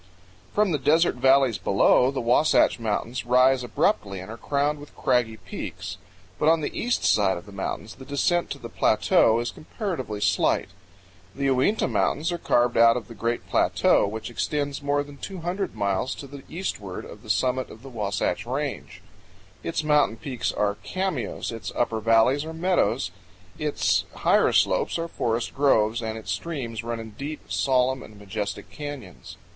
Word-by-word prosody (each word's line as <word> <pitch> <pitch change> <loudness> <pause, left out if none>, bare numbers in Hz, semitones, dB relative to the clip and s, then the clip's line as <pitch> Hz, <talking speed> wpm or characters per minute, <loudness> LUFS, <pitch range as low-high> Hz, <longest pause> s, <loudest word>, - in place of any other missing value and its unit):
From 210 -2 +2
the 150 - 0
desert 160 +6 +3
valleys 130 -3 +4
below, 100 +5 +4
the 135 -1 -2
Wasatch 125 +2 +3
Mountains 115 +3 -2
rise 125 +1 +4
abruptly 100 -4 0
and 95 +4 -8
are - - -6
crowned 145 +3 0
with 145 - -13
craggy 120 -4 +1
peaks. - - -7 0.4
But 155 - +4
on 165 0 +4
the - - -4
east 245 +1 0
side 100 -3 +3
of 85 - -10
the 100 - -12
mountains 100 +2 -5
the 130 - -12
descent 160 +5 +1
to - - -4
the - - -8
plateau 115 +1 +3
is 120 - -2
comparatively 155 - -5
slight. 100 -1 +1 0.7
The 140 0 +1
Uinta 135 +12 +2
Mountains 160 +5 0
are 175 - -3
carved 120 -5 +2
out 115 +1 +6
of 115 -5 -7
the - - -8
great 115 +2 -2
plateau - - +3
which 110 +3 -5
extends 145 +3 -2
more 145 0 +1
than 145 0 -12
two 190 +4 -7
hundred 185 - -3
miles 100 +4 -1
to - - -8
the 140 0 -10
eastward 105 - -5
of - - -11
the - - -14
summit 130 0 +1
of 110 - -13
the 135 - -9
Wasatch 105 -3 -2
Range. 140 +2 -4 0.6
Its 160 -2 -2
mountain 150 -6 +3
peaks 125 0 -3
are 100 -1 0
cameos, 185 - -3
its 115 -1 -6
upper 115 -2 0
valleys 115 +6 +3
are 160 +1 -6
meadows, 160 - +1 0.5
its 150 -1 +1
higher - - +3
slopes - - +2
are 165 0 -3
forest 115 -6 -2
groves, 120 -5 +3
and 110 -1 -4
its 110 - -5
streams 125 -9 -4
run 115 0 -3
in 110 -1 -8
deep, 140 +8 -7
solemn, 130 -1 +2
and 105 - -12
majestic 105 0 -5
canyons. 145 - -8
125 Hz, 175 wpm, -25 LUFS, 110-145 Hz, 0.7 s, out